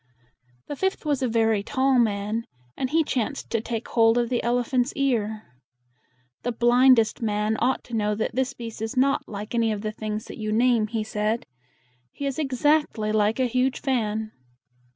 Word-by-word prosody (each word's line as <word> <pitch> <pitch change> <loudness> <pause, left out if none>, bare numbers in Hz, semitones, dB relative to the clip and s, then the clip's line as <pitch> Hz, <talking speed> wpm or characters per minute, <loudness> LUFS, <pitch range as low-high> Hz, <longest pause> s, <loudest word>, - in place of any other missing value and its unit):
The - - -4
fifth 380 +2 -2
was 290 -3 0
a 255 - +1
very 225 -2 +2
tall 265 +3 +2
man, 215 0 0 0.3
and 260 - -2
he 320 +3 +3
chanced 275 0 -3
to 230 - 0
take 230 0 -4
hold 225 0 +4
of 240 -1 +1
the 245 -2 0
elephant's 245 +2 +1
ear. 220 -6 0 1.0
"The 245 - -2
blind 245 +2 +5
est 225 +1 +1
man 210 0 0
ought 260 +2 +1
to 240 - -13
know 210 -1 0
that 220 - -2
this 260 +2 -1
beast 230 -2 -8
is 220 +3 -4
not 275 +2 +2
like 210 +1 -6
any 230 -1 +2
of 210 -1 -3
the 215 0 -3
things 215 0 -5
that - - -10
you 215 0 -2
name," 230 -1 +3
he 220 0 -2
said. 215 +1 -2 0.7
"He 285 - -6
is 275 +1 -2
ex 270 -3 -3
act 300 -3 +3
ly 215 -1 -1
like 215 +2 +1
a 260 - +3
huge 255 +2 0
fan." 220 -5 -1
230 Hz, 195 wpm, -25 LUFS, 215-260 Hz, 1.0 s, blind